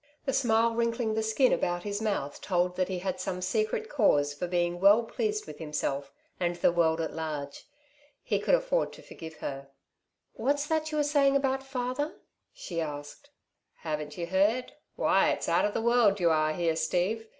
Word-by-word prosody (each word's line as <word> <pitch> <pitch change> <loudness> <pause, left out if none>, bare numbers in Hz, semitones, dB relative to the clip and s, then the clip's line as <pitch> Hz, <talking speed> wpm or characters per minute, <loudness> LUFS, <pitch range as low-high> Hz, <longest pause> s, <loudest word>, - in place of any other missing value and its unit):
The 270 - 0
smile 230 -2 +3
wrinkling 230 -1 0
the 220 - 0
skin 220 +4 +3
about 175 0 -1
his 205 0 -3
mouth 200 -10 -2
told 180 -1 0
that 185 0 0
he 185 - -3
had 185 0 -3
some 185 0 -3
secret 215 - -1
cause 145 - +2
for 175 +5 -4
being 175 0 0
well 205 +5 +6
pleased 425 - -2
with - - -10
himself 140 -3 -3 0.3
and 175 -1 0
the 175 - +3
world 165 -1 +2
at 160 - -2
large. 150 -3 -5 0.6
He - - 0
could - - +3
afford - - 0
to - - -13
forgive 160 -1 -10
her. 135 0 -5 0.6
"What's 285 +1 0
that 315 0 -1
you 305 - -2
were 295 - +3
saying 285 -2 +3
about 270 -1 +1
father?" 270 +4 -3 0.4
she 170 -2 -5
asked. 145 - -7 0.5
"Haven't 150 -2 -4
you 170 - -2
heard? 205 +8 +1 0.2
Why - - +3
it's - - -1
out - - +3
of 205 - -2
the - - -1
world 235 -4 +4
you 170 -2 +3
are 155 -1 +2
here, 165 -1 0
Steve. 180 +8 -1
195 Hz, 185 wpm, -29 LUFS, 165-250 Hz, 0.6 s, well